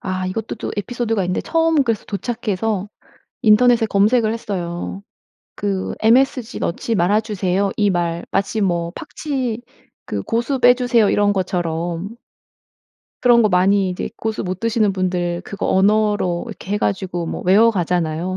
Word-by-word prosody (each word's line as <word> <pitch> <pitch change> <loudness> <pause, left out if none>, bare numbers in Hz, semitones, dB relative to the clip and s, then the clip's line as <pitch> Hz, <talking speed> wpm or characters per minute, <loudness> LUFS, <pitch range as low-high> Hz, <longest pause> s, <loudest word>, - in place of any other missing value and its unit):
아 185 -1 -3
이것도 210 +4 -4
또 - - -5
에피소드가 225 -2 -1
있는데 180 0 -1
처음 325 -3 +2
그래서 225 -3 -1
도착해서 210 -2 -2 0.5
인터넷에 230 +1 +5
검색을 215 +3 +2
했어요. 190 -3 -5 0.5
그 195 -2 -2
"MSG 245 +1 +2
넣지 225 +6 -2
말아 200 +5 +2
주세요." 195 -2 -1
이 205 -1 +3
말 170 -2 -1
마치 205 +2 -1
뭐 170 -3 0
팍치 260 -6 -4 0.4
그 100 - -3
"고수 240 +4 -1
빼주세요." 245 -3 +4
이런 205 0 +2
것처럼. 175 +1 -2 1.1
그런 240 -2 +6
거 215 - +3
많이 190 +1 +3
이제 180 - -4
고수 220 -1 -3
못 185 0 -4
드시는 225 -3 +1
분들 180 -2 -1
그거 200 - -4
언어로 205 -2 +2
이렇게 195 - -7
해 210 - +1
가지고 185 -4 -2
뭐 - - -5
외워가잖아요. 180 -4 +2
200 Hz, 315 characters per minute, -20 LUFS, 180-225 Hz, 1.1 s, 그런